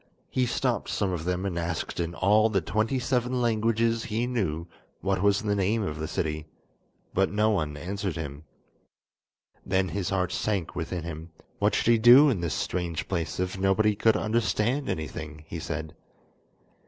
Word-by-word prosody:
He 125 -1 +1
stopped - - -1
some 95 - 0
of 85 -2 -3
them 90 +1 -1
and 90 -3 -2
asked 85 0 -3
in 85 0 -2
all 105 +3 +4
the 100 -3 +2
twenty 110 +10 0
seven 125 0 0
languages 115 0 +1
he 115 +1 -1
knew 95 -10 -1 0.4
what 95 -1 0
was 100 0 +3
the 105 -1 +1
name 105 +3 +1
of 75 -5 -4
the 80 - -3
city, 75 -1 -3 0.7
but 95 +1 +2
no 105 +2 +2
one 75 -7 -1
answered 95 +3 -3
him. 75 -2 -6 1.2
Then 95 -1 +1
his 95 +1 -2
heart 95 -2 0
sank 100 -6 -2
within 85 0 -3
him; 85 0 -7 0.3
what - - +2
should 120 - +3
he 115 - +4
do 125 +6 +8
in 100 -8 -1
this 85 -2 -1
strange 85 -3 -2
place 85 -4 -2
if 90 +1 -2
nobody 100 +2 +3
could 110 +2 +3
understand 115 +4 0
anything? 80 0 -5
he 85 - -5
said. 80 -1 -5
95 Hz, 170 wpm, -27 LUFS, 85-110 Hz, 1.2 s, do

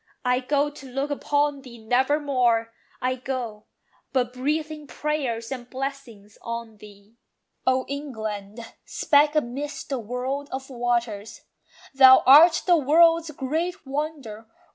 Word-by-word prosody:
I 250 0 +2
go, 285 +3 0
to 275 -2 -12
look 270 +3 -3
upon 285 0 0
thee 250 -3 -12
never 255 +6 +1
more; 240 -5 +1 0.3
I 255 0 +1
go, 250 -4 -5 0.5
but 250 -2 0
breathing 300 +3 -3
prayers 255 -5 -3
and 250 -2 -6
blessings 255 -6 -7
on 230 -2 -6
thee. 205 +2 -17 0.5
O 260 0 +2
England, 220 -7 -6 0.2
speck 295 +1 +2
amidst 285 +1 -3
the 270 -3 -2
world 255 +5 -4
of 265 +1 -6
waters! 235 -4 -2 0.5
Thou 260 -1 +8
art 315 +6 +7
the 350 -2 +5
world's 330 +3 +4
great 315 +6 -3
wonder. 270 -6 -5
260 Hz, 125 wpm, -24 LUFS, 235-290 Hz, 0.5 s, Thou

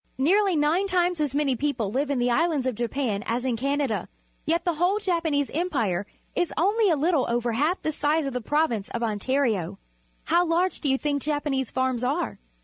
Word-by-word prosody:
Nearly 375 +7 +3
nine 315 +6 +2
times 355 -3 +1
as 285 -2 -1
many 285 -3 +2
people 240 -6 -1
live 275 +5 -1
in 280 - 0
the 245 0 +1
islands 310 -1 +1
of 255 - 0
Japan 235 -2 -2
as 240 +3 -1
in 250 -3 +1
Canada, 275 -1 -1 0.4
yet 335 +3 +1
the 350 - +2
whole 355 +6 +1
Japanese 335 -8 0
Em 345 +5 0
pire 200 - -1 0.3
is 350 - 0
only 410 +4 +3
a 330 - +4
Httle 305 -3 +1
over 240 0 0
half 300 +11 +1
the 310 - 0
size 300 +1 0
of 275 - -3
the 250 - -2
prov 300 +6 +1
ince 210 -4 -4
of 235 - -3
Ontario. 220 -3 0 0.5
How 345 +1 +3
large 355 +2 0
do 290 - 0
you 265 - +3
think 285 0 -1
Japanese 290 -3 -1
farms 260 -2 -1
are? 295 +7 -1
285 Hz, 205 wpm, -25 LUFS, 245-335 Hz, 0.5 s, a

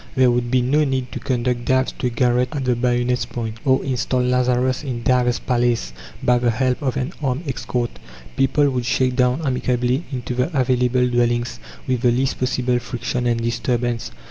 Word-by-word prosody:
There 130 -2 +5
would 120 0 0
be 125 0 +2
no 145 +5 +3
need 130 -3 -2
to - - -5
conduct 125 -2 -1
Dives 130 0 +2
to 125 - 0
a - - +1
garret 125 +1 +1
at 135 -2 -2
the 125 -1 +2
bayonet's 120 0 0
point, 115 -1 -5
or 130 -1 +2
install 125 -1 0
Lazarus 125 +1 +1
in 125 -4 -4
Dives's 125 0 +2
palace 120 - 0 0.3
by 125 0 +3
the 120 0 +2
help 125 +4 0
of 135 -2 -1
an 135 +6 -2
armed 140 +3 -2
escort. 125 -2 -3 0.4
People 135 +2 +3
would 125 -2 -2
shake 130 +1 +1
down 125 +4 +2
amicably 125 +1 0
into 125 -2 -4
the 130 +4 0
available 125 0 +2
dwellings 120 -1 0 0.3
with 130 -2 -1
the 125 - +4
least 130 +3 0
possible 125 -1 0
friction 120 0 -3
and 115 -1 0
disturbance. 120 0 -1
125 Hz, 185 wpm, -21 LUFS, 120-130 Hz, 0.4 s, There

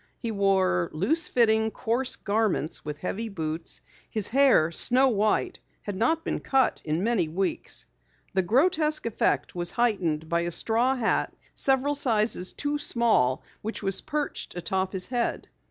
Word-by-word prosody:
He 230 - -4
wore 190 - +1
loose 280 - +1
fitting, 220 -2 +2
coarse 240 +4 0
garments 200 -6 -1
with 150 -1 -6
heavy 215 +7 -4
boots. 160 -3 -3 0.3
His 215 -3 +2
hair, 255 - +4
snow 255 +9 +5
white, 215 -2 0 0.2
had 205 - -5
not 315 +11 0
been - - -2
cut 265 -2 +1
in 160 +3 -2
many 220 -7 +1
weeks. 180 +4 -3 0.5
The 190 - +2
grotesque 305 - +2
effect 230 - 0
was 175 -1 -2
heightened 180 -10 0
by 170 +1 0
a 170 - -2
straw 235 +9 +2
hat 235 -4 0 0.2
several 270 +1 +2
sizes 220 -8 +1
too 290 0 -2
small 225 - +2 0.2
which 220 0 -6
was 195 -1 +3
perched 300 - -4
atop 190 +2 -1
his 190 -2 -2
head. 245 -2 -2
215 Hz, 150 wpm, -26 LUFS, 180-250 Hz, 0.5 s, snow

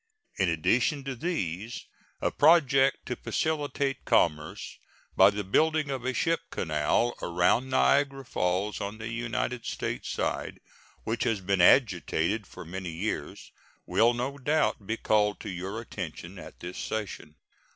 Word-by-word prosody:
In 95 -3 +3
addition 120 - +1
to 135 -1 -4
these, 115 - -3 0.4
a - - +1
project 140 -4 +4
to 125 - -3
facilitate 145 -3 -1
commerce 75 -1 0 0.4
by 95 +1 +7
the 105 0 -3
building 155 +8 +2
of 130 -2 -4
a 130 - +1
ship 165 -1 +1
canal 80 +9 0
around 90 +9 +2
Niagara 135 +1 +2
Falls, 95 -1 -1
on 100 +2 -4
the 110 +1 -6
United 120 +1 -2
States - - -3
side, - - -2 0.4
which 115 +1 -1
has 115 -4 +1
been 95 0 +1
agitated 100 - +3
for - - -10
many 90 +2 -5
years, 80 -3 -4 0.3
will 120 +1 +3
no 135 +4 -3
doubt 145 -7 0
be 115 - -1
called 105 -2 +2
to - - -6
your 95 +4 -5
attention 90 -4 -7
at - - -12
this 90 +1 -6
session. 105 -8 -5
110 Hz, 140 wpm, -28 LUFS, 90-135 Hz, 0.4 s, by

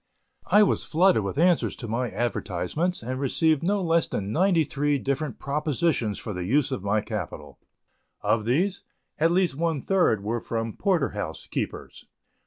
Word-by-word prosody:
I 210 - +6
was 200 - +1
flooded 180 - +3
with 100 +7 -4
answers 175 +1 +3
to 120 - -7
my 120 +3 -1
advertisements 120 - -2
and 130 +2 -3
received 155 +2 +2
no 195 +3 0
less 165 -1 +2
than 100 0 -3
ninety 175 - +3
three 145 0 0
different 140 -1 -2
propositions 145 - 0
for 105 - -5
the 90 -1 -4
use 140 +8 +1
of 115 -8 -3
my 105 +1 +1
capital. 90 - -6 0.6
Of 110 -2 +1
these, 175 - +1 0.4
at 165 +2 +4
least 180 -2 +2
one 165 -1 0
third 175 - +2
were 115 +3 -1
from 115 -1 -3
porter 180 -8 +1
house 100 -6 -5
keepers. - - -5
140 Hz, 165 wpm, -26 LUFS, 110-170 Hz, 0.6 s, I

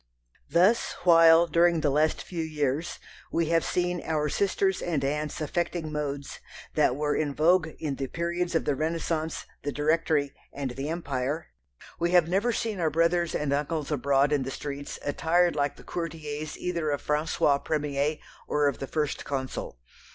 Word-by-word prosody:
Thus 185 +10 +3
while, 165 -1 +7
during 170 -1 +3
the 145 - +2
last 155 +3 +1
few 175 -3 -4
years, 150 0 -2 0.3
we 165 -1 0
have 165 -1 +3
seen 180 -1 -1
our 150 -2 0
sisters 195 +2 +1
and 150 -6 -1
aunts 150 +1 -2
affecting 165 0 -2
"modes" 145 -2 -4 0.3
that 125 - +3
were 150 +1 0
in 145 -3 -1
vogue 165 +2 +4
in 145 -4 -3
the 135 - -3
periods 170 +3 -2
of 165 - +1
the 145 - +2
Renaissance, 160 +1 -2 0.2
the 145 - -3
Directory, 150 -1 +1 0.2
and 140 -3 -4
the 135 +4 -4
Empire, 145 -2 -3 0.5
we 170 - +1
have 175 -3 +5
never 195 +7 +1
seen 225 -4 -2
our 165 -2 +2
brothers 170 +2 +1
and 145 -2 0
uncles 150 +1 -2
abroad 140 0 +2
in 145 - +2
the 130 - -3
streets 140 +1 -6
attired 170 +3 +2
like 145 -1 0
the - - -14
courtiers 155 -3 -5
either 170 -3 -2
of 145 -1 -2
François 150 -1 +1
premier 150 -1 0 0.3
or 150 -1 +2
of 140 - -1
the 135 - -4
First 150 -1 -2
Consul. 130 - -4
155 Hz, 165 wpm, -27 LUFS, 145-170 Hz, 0.5 s, while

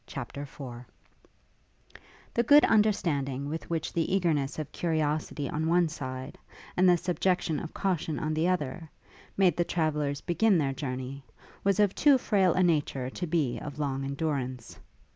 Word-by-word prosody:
CHAPTER 140 +1 -6
IV 130 -4 -8 1.5
The 235 - +3
good 290 +5 +7
understanding 145 - +1
with 160 +3 -5
which 165 -2 -2
the 165 0 0
eagerness 150 -7 0
of 155 -2 -5
curiosity 155 -3 -1
on 155 +4 -2
one 170 0 +3
side, 130 -4 -6 0.4
and 185 +1 +5
the 175 - +5
subjection 180 -2 0
of 160 - -7
caution 170 -5 -1
on 155 0 -2
the 160 +2 +1
other, 165 -2 -2 0.5
made 185 -5 +4
the 175 - +3
travellers 150 -4 -1
begin 185 +3 +2
their 140 -4 0
journey, 130 0 -5 0.4
was 200 0 +2
of 205 -2 +4
too 285 -3 +5
frail 195 -7 +2
a 185 - +3
nature 145 -6 0
to 180 - -4
be 155 -7 0
of 145 -2 -7
long 135 -2 -2
endurance. 135 -4 -3
155 Hz, 155 wpm, -28 LUFS, 140-180 Hz, 1.5 s, good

